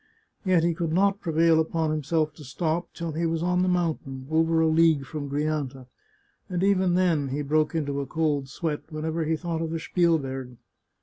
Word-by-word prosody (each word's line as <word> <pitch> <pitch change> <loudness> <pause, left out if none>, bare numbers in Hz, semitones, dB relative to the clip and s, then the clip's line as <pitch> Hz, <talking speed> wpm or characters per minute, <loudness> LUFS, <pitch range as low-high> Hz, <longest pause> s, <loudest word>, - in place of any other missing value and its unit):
Yet 185 -4 +3
he 170 0 +2
could 165 -1 -2
not 195 +3 +2
prevail 165 -1 +3
upon 160 0 0
him 155 0 -1
self 155 +1 0
to 150 - -13
stop 160 +6 -2
till 170 -1 -4
he 165 +2 -1
was 165 0 -1
on 180 0 +2
the 185 - +2
mountain, 155 -7 -1
over 165 +1 +3
a 160 - +4
league 160 -3 +4
from 145 0 -5
Grianta, 145 -3 -2 0.6
and 180 -1 -1
even 190 -3 +3
then 170 -6 +2
he 140 +3 -2
broke 155 +3 +1
into 140 -3 -1
a 140 - -5
cold 145 -3 0
sweat, 155 0 -3
when 155 0 -5
ever 160 0 -1
he 160 +1 +1
thought 165 0 -3
of 165 - -2
the 165 0 -3
Spielberg. 135 -8 0
160 Hz, 200 wpm, -26 LUFS, 150-170 Hz, 0.6 s, a